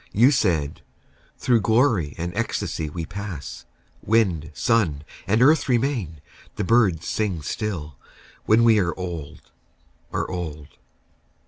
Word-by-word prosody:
You 120 +7 +5
said, 85 - 0 0.6
"Through 120 -3 +2
glory 110 - +2
and 85 +2 -4
ecstasy 105 -8 -2
we 80 +2 -5
pass; 100 -8 -7 0.4
Wind, 95 -9 +1
sun, 90 -12 +1 0.2
and 110 +5 +3
earth 150 0 +4
remain, 115 - 0 0.3
the 105 - -2
birds 95 -6 +3
sing 95 -8 -2
still, 75 -6 -4 0.5
When 110 +2 +4
we 115 -2 +5
are 85 -3 -1
old, 85 -5 -7 0.6
are - - -2
old. 80 -5 -6
95 Hz, 120 wpm, -23 LUFS, 80-115 Hz, 0.6 s, You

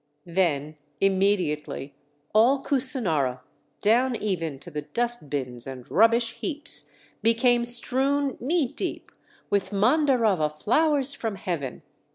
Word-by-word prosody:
Then 155 -4 -1 0.2
immediately 185 -8 0 0.4
all 250 +6 +4
Kusinara 185 - +2 0.4
down 240 +4 +3
even 170 -9 -3
to 175 - -8
the 150 -1 -4
dust 235 +3 -2
bins 125 -4 -3
and 130 -2 -8
rubbish 230 +3 +3
heaps 300 -4 -2 0.3
became 235 +2 +3
strewn 265 +3 +3
knee 300 +3 0
deep - - -5 0.4
with 195 -2 0
Mandarava 220 - +2
flowers 280 - +1
from 225 -6 -4
heaven! 155 -9 -5
210 Hz, 110 wpm, -25 LUFS, 155-250 Hz, 0.4 s, all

